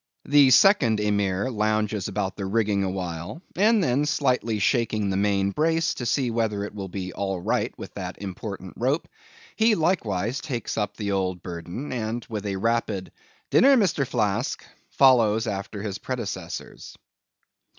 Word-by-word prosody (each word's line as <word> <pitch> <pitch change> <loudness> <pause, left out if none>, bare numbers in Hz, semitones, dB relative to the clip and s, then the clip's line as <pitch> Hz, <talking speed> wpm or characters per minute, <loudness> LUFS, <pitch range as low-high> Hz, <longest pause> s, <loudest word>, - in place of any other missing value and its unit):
The 145 -2 +6
second 130 - +5
Emir 100 +2 0
lounges 105 -2 0
about 100 -1 -2
the 100 -2 -4
rigging 105 -1 +1
awhile, 90 - -4
and 210 +2 +4
then 140 +1 +1
slightly 125 -6 +1
shaking 110 -1 +1
the - - -1
main 100 0 +1
brace, 160 +6 +1
to 125 - -4
see 125 0 +1
whether 110 -3 -1
it 105 - -6
will 100 -2 -5
be 90 -1 -5
all 95 -2 -2
right - - 0
with - - -9
that - - -6
important 95 -1 -6
rope, 135 +7 0 0.5
he 220 0 +4
likewise 120 - 0
takes 130 -7 -4
up 105 -1 -2
the 105 -2 -2
old 95 -2 -1
burden, 90 - -6
and 115 -1 -3
with 105 -2 -3
a 100 - -2
rapid 110 -2 -1 0.4
"Dinner, 275 +1 +6
Mr. 165 - +1
Flask," 105 +4 -1 0.2
follows 115 -5 +4
after 100 -1 -4
his 105 -1 -4
predecessors. 100 -9 -6
105 Hz, 150 wpm, -25 LUFS, 100-130 Hz, 0.5 s, The